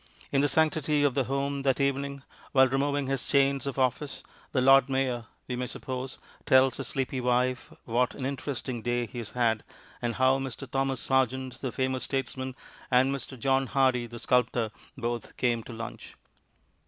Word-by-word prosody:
In 135 Hz, -, +3 dB
the 145 Hz, -, +3 dB
sanctity 155 Hz, 0 st, +2 dB
of 145 Hz, -3 st, +3 dB
the 135 Hz, -1 st, +1 dB
home 140 Hz, +1 st, -1 dB
that 135 Hz, -1 st, +1 dB
evening, 140 Hz, 0 st, -1 dB, 0.3 s
while 130 Hz, -1 st, +7 dB
removing 140 Hz, +2 st, 0 dB
his 135 Hz, 0 st, -1 dB
chains 140 Hz, 0 st, +2 dB
of 140 Hz, -, -3 dB
office, 130 Hz, +1 st, 0 dB, 0.3 s
the 130 Hz, -, +1 dB
Lord 135 Hz, +1 st, +6 dB
Mayor 130 Hz, -3 st, 0 dB, 0.2 s
(we 125 Hz, -, -2 dB
may 125 Hz, 0 st, -2 dB
suppose) 130 Hz, +1 st, -5 dB, 0.3 s
tells 130 Hz, 0 st, +5 dB
his 135 Hz, -, -4 dB
sleepy 130 Hz, -1 st, -2 dB
wife 125 Hz, +1 st, +1 dB
what 120 Hz, +2 st, +1 dB
an 130 Hz, -, -4 dB
interesting 130 Hz, -3 st, -3 dB
day 120 Hz, +1 st, 0 dB
he 120 Hz, +2 st, -7 dB
has 115 Hz, -, -7 dB
had, 115 Hz, -3 st, +1 dB, 0.4 s
and 120 Hz, -1 st, -1 dB
how 130 Hz, +1 st, +4 dB
Mr. 135 Hz, 0 st, -5 dB
Thomas 135 Hz, 0 st, 0 dB
Sargent, 130 Hz, 0 st, 0 dB
the 130 Hz, -, -2 dB
famous 130 Hz, 0 st, -1 dB
statesman, 130 Hz, -1 st, -3 dB, 0.3 s
and 130 Hz, +2 st, +4 dB
Mr. 135 Hz, -1 st, -6 dB
John 135 Hz, +2 st, +2 dB
Hardy, 130 Hz, -3 st, +2 dB
the 120 Hz, 0 st, -9 dB
sculptor, 120 Hz, -2 st, +1 dB, 0.3 s
both 120 Hz, -2 st, -4 dB
came 120 Hz, -2 st, +1 dB
to -, -, -8 dB
lunch. 115 Hz, 0 st, -8 dB
130 Hz, 175 wpm, -28 LUFS, 125-135 Hz, 0.4 s, while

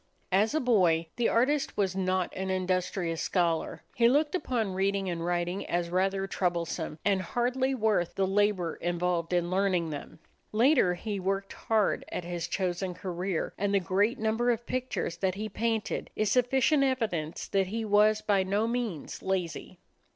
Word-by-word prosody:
As 210 Hz, +8 st, +3 dB
a -, -, +3 dB
boy 180 Hz, -, +3 dB
the 240 Hz, -, +2 dB
artist 275 Hz, +5 st, +1 dB
was 190 Hz, -2 st, +1 dB
not 185 Hz, -1 st, 0 dB
an 190 Hz, 0 st, -3 dB
industrious 185 Hz, -2 st, -1 dB
scholar. 170 Hz, -3 st, 0 dB
He 235 Hz, 0 st, +4 dB
looked 295 Hz, +3 st, +2 dB
upon 235 Hz, -, -1 dB
reading 195 Hz, +1 st, 0 dB
and 165 Hz, -1 st, -3 dB
writing 175 Hz, +2 st, -1 dB
as 175 Hz, 0 st, -1 dB
rather 195 Hz, +1 st, +1 dB
troublesome 170 Hz, -4 st, -2 dB
and 195 Hz, -2 st, +2 dB
hardly 250 Hz, +7 st, 0 dB
worth 215 Hz, -7 st, +1 dB
the 195 Hz, -, +2 dB
labor 195 Hz, -3 st, +1 dB
involved 175 Hz, -1 st, -1 dB
in 175 Hz, 0 st, +1 dB
learning 185 Hz, -4 st, +1 dB
them. 145 Hz, -, -7 dB, 0.3 s
Later 230 Hz, -5 st, +4 dB
he 205 Hz, +2 st, -4 dB
worked 195 Hz, +1 st, -2 dB
hard 220 Hz, -3 st, +1 dB
at -, -, -3 dB
his 170 Hz, -1 st, -4 dB
chosen 180 Hz, 0 st, -2 dB
career, 180 Hz, -1 st, -3 dB
and 200 Hz, 0 st, +1 dB
the -, -, +5 dB
great 200 Hz, +7 st, +1 dB
number 225 Hz, +2 st, +1 dB
of 235 Hz, 0 st, 0 dB
pictures 255 Hz, -10 st, -3 dB
that 185 Hz, +1 st, 0 dB
he 215 Hz, +2 st, -3 dB
painted 225 Hz, +1 st, -2 dB
is 215 Hz, -2 st, +1 dB
sufficient 265 Hz, +4 st, +3 dB
evidence 215 Hz, -, -1 dB
that 195 Hz, -1 st, +1 dB
he 225 Hz, +3 st, -3 dB
was 210 Hz, +1 st, +4 dB
by 200 Hz, -2 st, +3 dB
no 200 Hz, +3 st, 0 dB
means 230 Hz, -10 st, -3 dB
lazy. 185 Hz, -4 st, -3 dB
195 Hz, 165 wpm, -29 LUFS, 175-220 Hz, 0.3 s, the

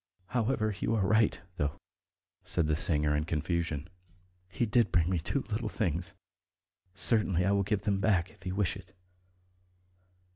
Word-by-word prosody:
However, 110 Hz, -3 st, 0 dB
you 115 Hz, -, 0 dB
are 100 Hz, -4 st, +1 dB
right, 110 Hz, +1 st, +3 dB, 0.2 s
though," 75 Hz, -4 st, -2 dB, 0.6 s
said 85 Hz, -, 0 dB
the 75 Hz, 0 st, +1 dB
singer 75 Hz, -2 st, +1 dB
in 75 Hz, -, +1 dB
confusion, 80 Hz, -1 st, -2 dB, 0.6 s
"he 120 Hz, -, 0 dB
did 115 Hz, -3 st, +2 dB
bring 85 Hz, -2 st, +3 dB
me 90 Hz, -, +1 dB
two 135 Hz, -, -1 dB
little 110 Hz, +2 st, -2 dB
things. 90 Hz, -5 st, -2 dB, 0.8 s
Certainly 100 Hz, -5 st, +3 dB
I 100 Hz, -, +3 dB
will 100 Hz, 0 st, +3 dB
give 100 Hz, 0 st, -1 dB
them 100 Hz, -2 st, +1 dB
back, 95 Hz, -3 st, +2 dB
if -, -, -21 dB
you 90 Hz, 0 st, -3 dB
wish 100 Hz, -3 st, +1 dB
it." 95 Hz, -1 st, -13 dB
95 Hz, 155 wpm, -30 LUFS, 85-105 Hz, 0.8 s, right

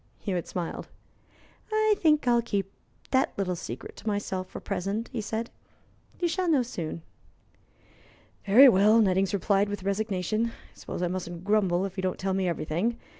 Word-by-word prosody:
Hewitt 180 Hz, -5 st, -3 dB
smiled. 175 Hz, -2 st, -4 dB, 0.8 s
"I 435 Hz, 0 st, +3 dB
think 305 Hz, -5 st, +3 dB
I'll 240 Hz, -1 st, +4 dB
keep 200 Hz, -4 st, -2 dB, 0.4 s
that 265 Hz, 0 st, +1 dB
little 185 Hz, -2 st, -1 dB
secret 125 Hz, -7 st, -7 dB
to -, -, -11 dB
myself 205 Hz, -3 st, -2 dB
for -, -, -8 dB
the -, -, -9 dB
present," 195 Hz, +4 st, -3 dB
he 235 Hz, -, -4 dB
said. 220 Hz, +2 st, -4 dB, 0.7 s
"You 350 Hz, -, +1 dB
shall 360 Hz, +1 st, 0 dB
know 285 Hz, -6 st, +4 dB
soon." 165 Hz, -8 st, -5 dB, 1.4 s
"Very 245 Hz, +8 st, +9 dB
well," 210 Hz, 0 st, +6 dB
Nettings 195 Hz, -2 st, +2 dB
replied, 200 Hz, +1 st, +1 dB
with 205 Hz, -2 st, -5 dB
resignation. 200 Hz, +1 st, -1 dB
"I -, -, -6 dB, 0.2 s
suppose -, -, -6 dB
I -, -, +2 dB
mustn't 175 Hz, -1 st, -5 dB
grumble 195 Hz, -3 st, +2 dB
if 195 Hz, 0 st, -7 dB
you -, -, -1 dB
don't 185 Hz, -1 st, -1 dB
tell 190 Hz, 0 st, -1 dB
me 190 Hz, -1 st, 0 dB
everything. 175 Hz, +7 st, -1 dB
200 Hz, 170 wpm, -27 LUFS, 185-230 Hz, 1.4 s, Very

